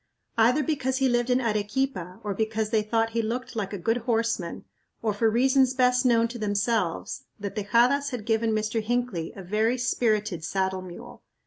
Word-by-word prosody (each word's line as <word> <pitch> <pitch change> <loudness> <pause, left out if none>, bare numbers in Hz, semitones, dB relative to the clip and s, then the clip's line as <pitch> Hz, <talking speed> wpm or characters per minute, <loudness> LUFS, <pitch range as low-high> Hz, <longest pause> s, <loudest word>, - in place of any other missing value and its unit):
Either 240 +6 +4
because 265 -3 -1
he 270 -1 +2
lived 240 0 +1
in 250 0 +3
Arequipa 210 -4 -2
or 205 -1 -2
because 220 +1 -1
they 220 -2 +3
thought 225 +1 0
he 230 0 0
looked 245 +3 -4
like 205 -3 -2
a 205 - -4
good 225 +6 0
horseman, 230 -6 -1 0.4
or 215 -2 +1
for 220 +2 +2
reasons 260 +3 +3
best 250 0 +3
known 230 -1 +4
to 235 +1 -8
themselves, 205 - -1
the 200 -1 -4
Tejadas 240 +7 +2
had 245 -5 -5
given 225 0 +1
Mr. 215 +1 0
Hinckley 230 -7 -2
a 195 - -8
very 215 +6 +1
spirited 215 -7 0
saddle 190 +1 -1
mule. 180 -2 -10
225 Hz, 180 wpm, -26 LUFS, 205-245 Hz, 0.4 s, Either